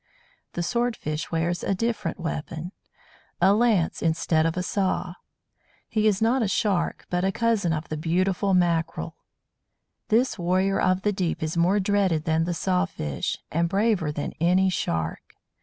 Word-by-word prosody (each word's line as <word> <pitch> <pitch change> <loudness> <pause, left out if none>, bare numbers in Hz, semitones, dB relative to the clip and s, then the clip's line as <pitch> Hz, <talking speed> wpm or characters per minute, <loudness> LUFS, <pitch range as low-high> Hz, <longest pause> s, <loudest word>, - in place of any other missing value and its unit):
The 175 - -2
Sword 235 +5 0
fish 150 +1 -4
wears 170 +1 -1
a 195 - 0
different 230 0 -2
weapon 165 +1 -4 0.7
a 195 - +5
lance 215 -6 +2
instead 160 -1 +2
of 165 - -3
a 180 - 0
saw. 185 -2 -1 0.7
He 215 -1 +1
is 210 0 +2
not 245 +3 +3
a 220 - +1
Shark, 195 -3 0
but 180 0 0
a 195 - +2
cousin 225 -6 +1
of 155 0 -2
the 155 - -3
beautiful 185 +4 +1
Mackerel. 170 -2 0 0.9
This 230 -1 +2
warrior 185 +3 +1
of 185 +1 +2
the 210 - +1
deep 180 -4 -2
is 155 +1 -2
more 180 +4 +3
dreaded 190 -5 +1
than 160 0 +1
the 175 0 -2
Saw 185 +1 +1
fish, 75 - -3
and 170 +2 +1
braver 195 -5 +1
than 145 -1 -4
any 185 +3 +3
Shark. 80 - -3
180 Hz, 160 wpm, -25 LUFS, 165-200 Hz, 0.9 s, a